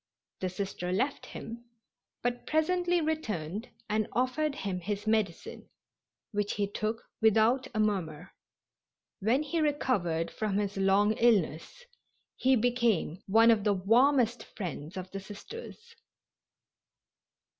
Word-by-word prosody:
The 185 - -1
Sister 185 -1 -4
left 260 +10 -1
him, 235 +1 -8 0.6
but 245 0 -2
presently 350 +2 +2
returned 220 - -3 0.2
and 215 0 0
offered 255 +5 0
him 190 -6 -3
his 205 +4 -4
medicine, 220 -2 -1 0.6
which 205 -1 -1
he 205 - 0
took 215 +3 -3 0.2
without 225 +4 +4
a - - 0
murmur. 185 -8 -1 0.9
When 240 +9 +2
he 315 +2 -1
recovered 200 - 0
from 210 -2 -1
his 205 -1 -1
long 195 +2 +3
illness 210 - +1 0.5
he 260 +1 +3
became 235 -7 +1
one 225 +3 +6
of 215 -3 +2
the 205 -1 +3
warmest 240 +5 +3
friends 170 -4 -5
of 185 0 -6
the 195 - -4
Sisters. 455 - -10
215 Hz, 120 wpm, -30 LUFS, 195-255 Hz, 0.9 s, one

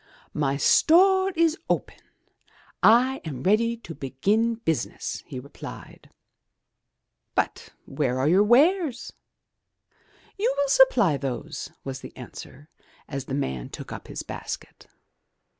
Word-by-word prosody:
*' - - -26
'*My 140 -2 0
store 380 - +5
is 330 +1 +2
open; - - -1 0.8
I 255 +4 +5
am 135 -5 -6
ready 230 +4 +2
to 200 -7 -10
begin 205 - 0
business," 165 -9 -3
he 130 - -6
replied. 140 +3 -11 1.3
*'But - - -1 0.2
where 135 -2 -1
are 130 +2 +1
your 180 +5 +5
wares?'' 280 - +3 1.3
'*You 465 +5 +2
will 285 -1 +1
supply 390 - +5
those," 135 -3 -5
was 135 -1 -6
the - - -11
answer, 130 +3 -11 0.4
as 140 -2 -5
the 135 - -3
man 65 - -3
took - - -9
up - - -8
his - - -6
basket. - - -8
195 Hz, 125 wpm, -25 LUFS, -, 1.3 s, store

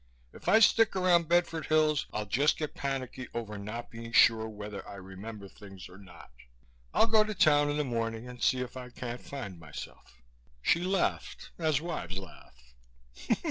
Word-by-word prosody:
If - - -5
I 220 - +7
stick 225 -1 +5
around 180 -3 +3
Bedford 170 -2 +1
Hills 155 -2 +2
I'll 105 0 -3
just 140 +8 +2
get 155 -2 -4
panicky 130 -2 -4
over 110 -3 -4
not 110 +4 -6
being 115 0 -8
sure 110 -1 +5
whether 105 -1 -7
I - - -8
remember 100 +2 -9
things 95 -1 -12
or 90 +2 -14
not. 90 -8 -14 0.6
I'll - - +4
go 220 -1 +5
to 215 0 -4
town 145 -4 +4
in 145 - -1
the 150 - +1
morning 115 -2 -3
and 125 -1 -10
see 130 - +2
if 125 0 -6
I 125 -1 -7
can't 120 0 -6
find 100 -11 -7
myself." 75 -4 -10 0.4
She 165 - +2
laughed, 190 0 -1
as 155 -3 +1
wives 95 - -4
laugh. 95 -9 -11
125 Hz, 175 wpm, -30 LUFS, 105-155 Hz, 0.6 s, I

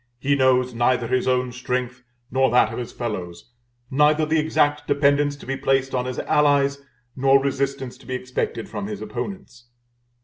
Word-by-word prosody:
He 140 +3 +1
knows 130 -2 +2
neither 120 +1 +1
his 130 +1 0
own 125 -1 +1
strength 125 0 -3 0.3
nor 130 0 +3
that 120 -2 +3
of - - -4
his 120 - -5
fellows, 105 -4 -6 0.4
neither 150 +3 +3
the 155 +1 +1
exact 150 -1 +1
dependence 145 0 +2
to 140 - -13
be 135 - -2
placed 135 0 0
on 125 -1 0
his 130 0 -4
allies 140 -1 +2 0.3
nor 135 +1 +4
resistance 135 -1 -2
to - - -17
be 130 - -3
expected 125 -2 -3
from 200 - -5
his 210 -1 -5
opponents. 190 - -7
130 Hz, 170 wpm, -23 LUFS, 125-145 Hz, 0.4 s, nor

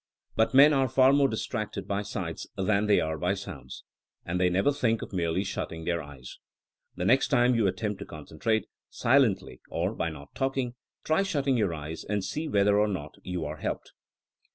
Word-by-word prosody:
But 110 +3 +2
men 145 +3 +8
are 135 -2 +2
far 130 +2 +5
more 140 -1 +5
distracted 110 -2 -4
by 100 0 -1
sights 90 -5 -5
than 100 +2 +1
they 105 - +5
are 80 -1 -2
by 90 +5 +1
sounds. 95 -9 -9 0.4
And 90 +2 -1
they 90 - +4
never 95 +10 +2
think 115 -5 0
of - - -9
merely 85 +1 0
shutting 80 -4 -5
their 85 -1 0
eyes. 70 -4 -11 0.6
The 90 - -3
next 130 +7 +4
time 125 -3 +3
you 115 -4 +2
attempt 105 +1 -2
to - - -6
concentrate 110 -1 -2 0.2
— - - -66
silently 115 - +2
or 90 +5 -1
by 85 - -2 0.2
talking 135 -2 -1 0.2
— - - -47
^try 160 +5 +2
shutting 140 -8 0
your 100 -8 +1
eyes 75 +2 -6
and 105 -1 -2
see 155 +1 -3
whether 100 -5 +3
or 105 - +3
not 75 -8 -4
you 90 -3 -4
are 75 +1 -5
helped. - - -4
105 Hz, 195 wpm, -28 LUFS, 90-125 Hz, 0.6 s, men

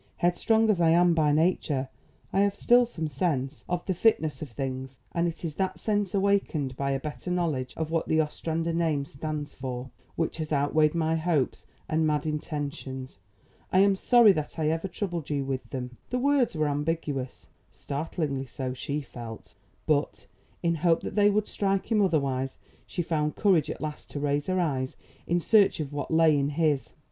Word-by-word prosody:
Headstrong 220 +6 +2
as 185 -4 0
I 165 - +5
am 175 +1 +5
by 155 -2 +3
nature, 150 -4 +1 0.5
I 195 - +2
have 200 0 +3
still 240 +3 +4
some 165 -9 -4
sense 140 -2 -2
of 175 -1 -2
the 190 - 0
fitness 160 -8 +2
of 155 - -5
things, 130 +2 -5
and 170 0 +1
it 170 +1 -5
is 160 - -3
that 190 -1 -1
sense 205 -3 0
awakened 195 -9 +1
by 140 +1 -1
a 135 0 0
better 150 +5 -6
knowledge 160 -8 -1
of 160 -1 -3
what 165 -1 0
the 160 - +2
Ostrander 165 +2 -1
name 160 -4 +1
stands 145 +1 -5
for, 130 0 -5 0.2
which 165 -1 -1
has 155 -1 -4
outweighed 150 +2 +2
my 160 -1 +1
hopes 160 -5 0 0.2
and 160 0 +1
mad 150 -1 0
intentions. 140 - -4 0.5
I 185 - +5
am 200 0 +5
sorry 235 +2 +6
that 155 -5 -3
I 155 -1 +1
ever 165 +4 -1
troubled 175 -4 -4
you 140 -2 -1
with 135 -1 -4
them." 125 -2 -5
The 250 - 0
words 270 -4 +2
were 155 -1 +1
ambiguous; 145 -3 -3 0.2
startlingly 140 -2 -3
so, 130 0 -4
she 140 +3 -3
felt; 115 -4 -9 0.3
but, 150 -1 0 0.4
in 170 -1 +2
hope 170 -2 +3
that - - -5
they 205 0 +5
would 210 0 +1
strike 195 +2 -1
him 215 -2 +4
otherwise, 135 -7 0 0.3
she 175 - -2
found 150 -2 -1
courage 175 -8 +3
at - - -5
last 150 -1 -5
to 145 - -5
raise 145 0 0
her 185 0 +1
eyes 135 -6 -1 0.3
in 175 +1 +2
search 205 +1 +4
of 145 -2 -4
what 145 - -3
lay 160 -1 +5
in 140 0 +1
his. 150 -2 0
155 Hz, 185 wpm, -27 LUFS, 140-175 Hz, 0.5 s, sorry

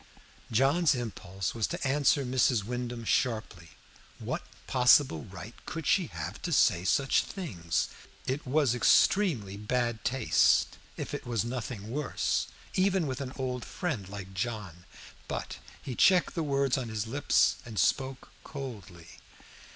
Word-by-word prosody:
John's 140 +8 +3
impulse 95 -5 -4
was 115 -2 0
to - - -3
answer 140 0 +3
Mrs. 125 -3 +2
Wyndham 120 +1 -4
sharply. 110 -9 -1 0.5
What - - -3 0.2
possible 125 - +4
right 100 +4 -9
could 160 -2 -5
she 180 +1 +3
have - - -6
to - - -3
say 85 - +4
such 135 +7 +3
things? 90 - -2 0.4
It 135 +2 -3
was 140 -2 +3
extremely 125 - +3
bad 120 +1 -1
taste, 130 +1 +3 0.2
if - - -5
it - - -5
was 115 -2 0
nothing 120 -3 -5
worse, 145 +1 -1 0.3
even 190 -2 +2
with 130 -1 -3
an 130 -1 -5
old 125 -2 -3
friend 130 - -4
like 95 -1 -8
John. 95 -4 -4 0.4
But - - -5 0.2
he 130 - -4
checked 180 +8 +4
the 165 - -1
words 140 -3 +1
on 120 -3 -4
his 110 -1 -2
lips 140 +6 +2
and 115 -4 -9
spoke 130 +6 0
coldly. 105 - -8
125 Hz, 140 wpm, -29 LUFS, 105-140 Hz, 0.5 s, possible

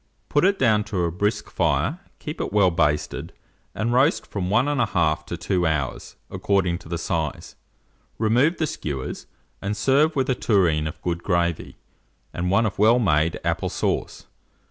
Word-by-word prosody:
Put 145 +4 +3
it 200 +1 +3
down 110 -5 +3
to 95 -4 -2
a 85 - 0
brisk 105 +4 -1
fire, 85 - 0 0.2
keep 150 - -6
it - - -3
well 100 -3 +4
basted, 75 -3 -1 0.4
and 115 +2 -1
roast 135 +6 +3
from 90 -3 -4
1 110 - +3
1/2 90 - +1
to 85 - -4
2 90 -1 0
hours, 75 -4 -3 0.2
according 95 -3 0
to 80 - -14
the 85 - -2
size. 80 -3 -3 0.6
Remove 125 +10 +2
the 160 - +1
skewers, 70 - -5 0.3
and 105 +1 -3
serve 145 +8 +3
with 135 -2 +1
a 130 - +2
tureen 85 -10 +2
of 80 - -7
good 85 -1 -2
gravy, 85 -3 -1 0.6
and 90 +1 -2
one 100 +4 +3
of 100 - -3
well 110 +3 +5
made 80 -8 +1
apple - - -1
sauce. - - -2
95 Hz, 165 wpm, -23 LUFS, 85-120 Hz, 0.6 s, well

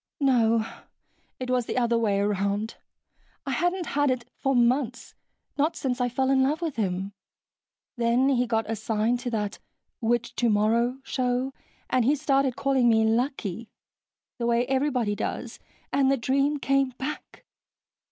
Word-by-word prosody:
"No. 230 -5 +3 0.7
It 255 -1 -3
was 250 -2 +1
the - - -3
other 235 -1 +2
way 210 -4 +1
around. 200 +2 0 0.7
I 275 - -2
hadn't 355 +6 0
had 290 0 +2
it 250 -2 -2
for 270 0 0
months, 245 +1 +1 0.5
not 310 +3 +2
since 255 -4 -2
I 245 - +1
fell 265 +2 0
in 265 -1 +4
love 290 +4 +1
with 330 -5 -3
him, 195 -2 -2 0.8
then 240 +3 +3
he 250 -2 +2
got 225 -1 0
assigned 220 +2 0
to 245 - -3
that 210 -3 -3 0.4
"Which 240 0 0
Tomorrow?" 235 +2 +2
show 255 0 -1 0.3
and 255 - +2
he 275 +6 +3
started 275 -3 +1
calling 265 -3 +2
me 220 -1 +4
"Lucky," 230 -3 -1 0.7
the 235 - 0
way 235 +1 +2
everybody 260 -5 0
does, - - -4 0.3
and 275 -1 +3
the 275 - +2
dream 275 +4 +1
came 275 -2 +1
back...." 295 +3 -6
245 Hz, 150 wpm, -26 LUFS, 225-270 Hz, 0.8 s, in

